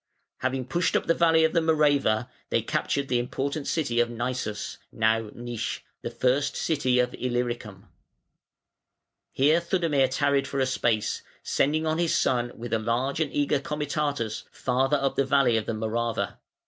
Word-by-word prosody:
] - - -50
Having 130 0 -2
pushed 170 +7 0
up - - +1
the 165 - +3
valley 165 -1 +4
of 160 - +2
the 170 - +4
Morava, 145 -8 +2 0.2
they - - +1
captured 140 -1 -1
the 125 -1 +1
important 140 +4 -3
city 130 -8 0
of 120 0 +3
Naissus 120 -3 -4
(now 110 0 +1
Nisch), 120 -2 -4 0.2
"the - - -4
first 135 +3 +1
city 135 -6 +1
of 125 0 +2
Illyricum". 120 -5 -3 1.4
Here 150 +5 +3
Theudemir 165 -6 +2
tarried 140 0 +1
for 140 - -3
a 130 - +3
space, 115 -4 0 0.2
sending 155 +3 +1
on 160 +1 0
his 170 -1 +2
son 120 -7 +1
with 120 0 -6
a 115 - +2
large 120 +6 -1
and 155 -3 0
eager 145 0 +1
comitatus 145 -5 -2
farther 135 +3 +1
up 135 -1 -1
the 140 - +4
valley 135 -3 +3
of 110 -2 -1
the - - -1
Morava. 110 -2 -2
130 Hz, 165 wpm, -26 LUFS, 120-145 Hz, 1.4 s, valley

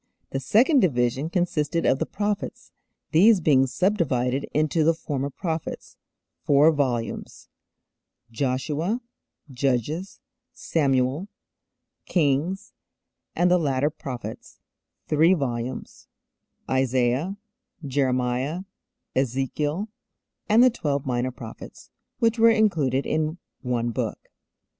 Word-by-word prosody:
The 135 - -1
second 230 - +4
division 130 - +1
consisted 170 -2 0
of 130 - +3
the - - -1
'Prophets,' 205 0 -3 0.4
these 200 +6 +6
being 135 -5 +4
subdivided 135 -7 0
into 155 +1 +1
the 165 +1 +3
'Former 140 -3 -3
Prophets' 160 +2 -5 0.5
(four 145 +3 +5
volumes) 125 -7 -3 0.8
Joshua, 145 - -1 0.5
Judges, 135 - -1 0.3
Samuel, 135 +2 0 0.8
Kings 165 +3 0 0.6
and 175 +1 +3
the 180 - +5
'Latter 145 -1 +1
Prophets' 130 -5 -8 0.5
(three 160 +5 +4
volumes) 125 -4 -4 0.6
Isaiah, 130 +7 +1 0.5
Jeremiah, 130 +3 0 0.5
Ezekiel 135 - -1 0.6
and 225 +3 +6
the 255 - +6
Twelve 145 - -2
Minor 125 -1 0
Prophets 120 -3 -11 0.3
(which 230 0 +1
were 230 +1 +7
included 160 - +2
in 155 +1 -1 0.2
one 120 -2 -1
book). - - -4
145 Hz, 95 wpm, -25 LUFS, 130-175 Hz, 0.8 s, were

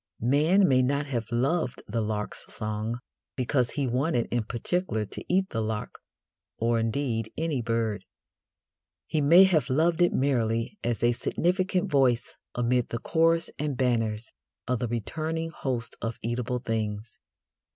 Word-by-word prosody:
Man 175 +7 +5
may 130 -2 +4
not 140 +3 +1
have 120 -6 -3
loved 130 +3 0
the 115 +2 -1
lark's 105 -1 -4
song 110 +2 -3 0.4
because 125 -1 +1
he 145 -3 -1
wanted 125 +1 0
in 120 -2 0
particular 120 - -1
to - - -7
eat 190 +1 +2
the 115 - -1
lark, 110 -1 -4 0.6
or, 115 0 +1
indeed, 115 -1 -1
any 160 -5 0
bird. 115 -3 -1 1.0
He 155 - 0
may 170 +6 +8
have 155 -8 +3
loved 165 +6 +2
it 175 - +5
merely 120 - 0
as 120 -1 -1
a 120 - +5
significant 180 - 0
voice 130 -4 +2 0.2
amid 120 0 +1
the 115 - -2
chorus 165 +5 +2
and 145 -3 -2
banners 115 -3 0 0.4
of 125 -1 0
the 120 - -1
returning 160 +8 -3
hosts 125 -8 -3
of 115 0 -3
eatable 125 +2 -1
things. 110 -2 -3
125 Hz, 145 wpm, -27 LUFS, 115-155 Hz, 1.0 s, may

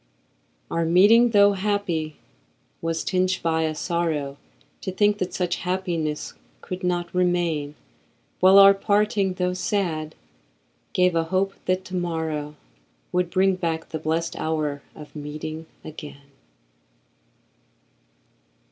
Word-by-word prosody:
Our 165 - 0
meeting, 205 +8 +6
tho' 205 -2 +6
happy, 190 -6 -1 0.7
was 165 0 -2
tinged 185 0 +1
by 160 -1 +1
a 155 0 -2
sorrow 155 -5 -2 0.4
To 190 - -4
think 205 +2 +2
that 185 - -2
such 175 -2 -1
happiness 170 -4 -2 0.3
could 185 0 -6
not 175 -1 -1
remain; 175 -5 0 0.6
While 190 +1 +7
our 195 0 +9
parting, 205 -1 +1
tho' 180 0 0
sad, 175 -5 -2 0.8
gave 180 -1 +3
a 165 -1 +1
hope 190 +3 0
that 185 +1 0
to 185 - -6
morrow 160 -4 -3 0.6
Would 180 -1 0
bring 190 +1 +3
back 165 -2 -3
the 160 - -4
blest 165 +2 -1
hour 150 -3 -2
of 150 0 -12
meeting 155 +2 -6 0.2
again. 145 -2 -10
175 Hz, 120 wpm, -24 LUFS, 160-185 Hz, 0.8 s, our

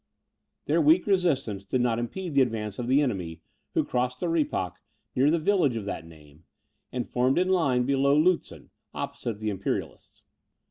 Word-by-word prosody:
Their 160 +3 +2
weak 160 +4 +5
resistance 155 - +1
did 130 - -1
not 120 -2 +1
impede 165 +9 -4
the 140 - +5
advance 110 -4 -2
of 120 - -3
the 135 +4 +4
enemy, 90 - -3 0.3
who - - +3
crossed 125 +1 -1
the 175 - -1
Rippach, 150 - -1 0.4
near 135 +3 +4
the 165 - +3
village 165 -6 +2
of 110 -3 -4
that 85 -5 -5
name, 75 -1 -17 0.5
and 125 -2 -3
formed 125 +2 +1
in 185 +1 +2
line 140 -10 +2
below 140 +1 +3
Lutzen, 175 +3 0 0.2
opposite 110 -3 -4
the 110 -1 -1
Imperialists. 100 -1 -5
125 Hz, 170 wpm, -27 LUFS, 110-155 Hz, 0.5 s, weak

